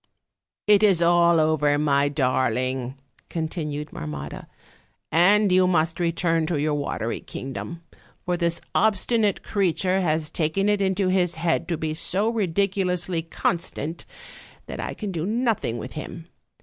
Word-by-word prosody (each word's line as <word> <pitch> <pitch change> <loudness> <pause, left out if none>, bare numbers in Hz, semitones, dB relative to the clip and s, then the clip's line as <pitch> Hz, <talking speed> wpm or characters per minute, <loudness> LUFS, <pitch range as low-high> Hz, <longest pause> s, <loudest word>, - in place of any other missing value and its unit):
"It 210 -1 +5
is 200 -5 +4
all 170 -1 +4
over, 150 -2 +2
my 145 -1 +2
darling," 130 -2 0 0.3
continued 155 -3 -4
Marmotta, 70 -2 -6 0.6
"and 195 +5 +4
you 185 0 +5
must 165 -2 +1
return 165 -1 +1
to 160 -3 -1
your 150 +1 0
watery 140 -5 -2
kingdom; 165 +6 -7 0.4
for 180 - 0
this 170 -1 0
obstinate 215 0 +2
creature 190 -1 +1
has 155 -3 0
taken 180 +6 0
it 205 -1 +1
into 190 0 +1
his 180 -2 +1
head 165 0 0
to 170 - -1
be 155 0 -2
so 190 +6 +1
ridiculously 185 -4 0
constant 165 -1 -3 0.6
that - - -7
I - - -4
can 210 -3 -5
do 165 -3 -3
nothing 220 - 0
with - - -7
him. 160 +1 -7
170 Hz, 135 wpm, -24 LUFS, 155-190 Hz, 0.6 s, It